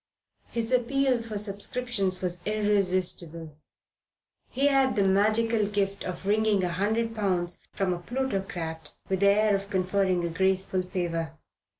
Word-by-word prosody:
His 230 0 -1
appeal 255 +1 +2
for 225 -2 -5
subscriptions 200 -1 -2
was 175 -1 -2
irresistible. 185 -6 0 0.9
He 270 +3 0
had 270 -2 +3
the 200 - +3
magical 215 +3 +3
gift 200 -1 -1
of 185 +1 -6
wringing 210 -1 +2
a 180 - 0
hundred 220 +6 0
pounds 185 -5 -1
from 190 -2 0
a 175 - -4
plutocrat 180 - -4 0.2
with 190 -1 0
the 200 - +4
air 210 +1 +4
of 200 0 -4
conferring 185 -2 +1
a - - -1
graceful 190 +2 +1
favour. 165 -3 -3
200 Hz, 135 wpm, -27 LUFS, 180-220 Hz, 0.9 s, the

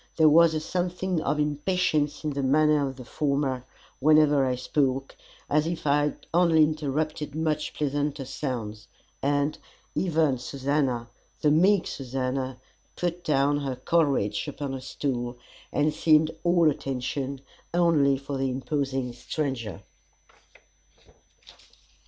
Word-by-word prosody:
There 160 -1 +6
was 165 +1 +6
a - - +1
something 180 +1 -2
of 150 - -1
impatience 150 0 0
in 155 - -1
the 140 0 -2
manner 150 +1 +3
of 135 - -8
the 125 -1 -10
former 140 -2 -1 0.3
whenever 150 -1 +5
I 125 - 0
spoke 135 +1 -1 0.3
as 150 +2 +2
if 170 -1 -4
I 145 0 +3
had 150 - -5
only 170 -2 +5
interrupted 155 0 -2
much 155 -1 -1
pleasanter 145 -1 -1
sounds; 115 -6 -5 0.3
and, 145 +1 0 0.3
even 160 -7 +1
Susannah, 130 -2 -1 0.3
the 150 - +4
meek 185 +5 +4
Susannah, 130 0 -3 0.4
put 175 0 -3
down 145 -1 +2
her 135 -3 -3
Coleridge 135 -6 +1
upon 145 -1 -4
a 130 - -5
stool, 125 -2 -3 0.3
and 150 +1 +1
seemed 155 0 +4
all 170 -3 +4
attention, 135 0 -4 0.3
only 160 -6 +3
for 135 0 -5
the 135 0 0
imposing 130 -1 -2
stranger. 120 - -4
145 Hz, 125 wpm, -26 LUFS, 135-155 Hz, 0.4 s, There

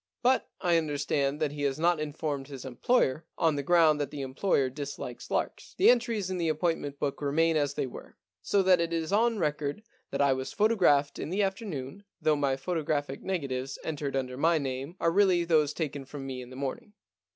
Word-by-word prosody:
But 255 +1 +3
I 175 -1 +3
understand 145 -2 0
that 150 -2 0
he 145 0 -6
has 140 -2 0
not 170 +1 +2
informed 150 -2 -3
his 135 -2 -8
employer, 135 - +1
on 160 -3 +2
the 140 - -1
ground 155 -1 +4
that 140 - -2
the 140 -1 -5
employer 135 +1 +1
dislikes 130 -2 -6
larks. - - -3
The 370 - +7
entries 230 -5 0
in 185 - -2
the 165 -1 +1
appointment 155 -2 -1
book 140 0 -2
remain 160 +3 +2
as 145 -2 +1
they - - 0
were. 130 - -10 0.2
So 200 -1 +2
that 185 -2 +5
it 170 0 -1
is 165 +3 -1
on 230 +2 +3
record 150 +2 -2 0.3
that 140 - -4
I 140 -1 +4
was 130 0 -4
photographed 185 -10 +3
in - - -4
the 200 +4 +1
afternoon, 190 - -4 0.2
though 155 - +3
the 140 -2 0
photographic 150 -3 -2
negatives 135 -8 -3
entered 145 -3 -3
under 130 -1 -2
my 165 +3 +3
name 135 +3 -4
are 165 - +2
really 185 -2 +4
those 155 -3 +3
taken 145 -4 -4
from 135 0 -8
me 130 -1 -5
in 125 - -10
the 130 - -10
morning. 205 - -5
150 Hz, 200 wpm, -29 LUFS, 140-175 Hz, 0.3 s, The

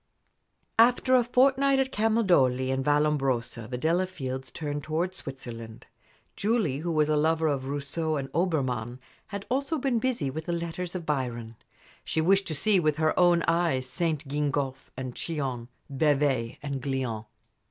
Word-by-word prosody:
After 245 +2 +5
a 250 -1 +6
fortnight 270 +3 +3
at 265 -1 +1
Camaldoli 175 - +2
and 135 0 0
Vallombrosa 135 -6 0
the 125 - -3
Delafields 155 -4 -2
turned 145 -2 -4
towards 170 +5 -2
Switzerland. 115 -5 -8 0.5
Julie, 205 - 0
who 170 +2 -2
was 155 -2 +2
a 155 - +2
lover 160 +2 +2
of 140 -3 -1
Rousseau 145 +3 -2
and 140 -2 -3
Obermann, 130 -9 0 0.3
had 200 -1 -5
been - - -15
also 275 +4 0
busy 250 - 0
with 160 +3 -5
the 175 - -2
letters 170 +1 -4
of 175 -3 -4
Byron. 120 -6 -2 0.5
She - - -1
wished 195 +5 +3
to 155 - -1
see 200 +5 +3
with 155 -3 +1
her 155 0 +2
own 175 -1 +5
eyes 165 -6 +1
St. 155 +2 -2
Gingolphe 140 -2 -2
and 130 -1 -4
Chillon, 135 -8 -3 0.2
Bevay 135 -4 +1
and 140 -2 -3
Glion. 125 -5 -2
150 Hz, 150 wpm, -27 LUFS, 130-180 Hz, 0.5 s, a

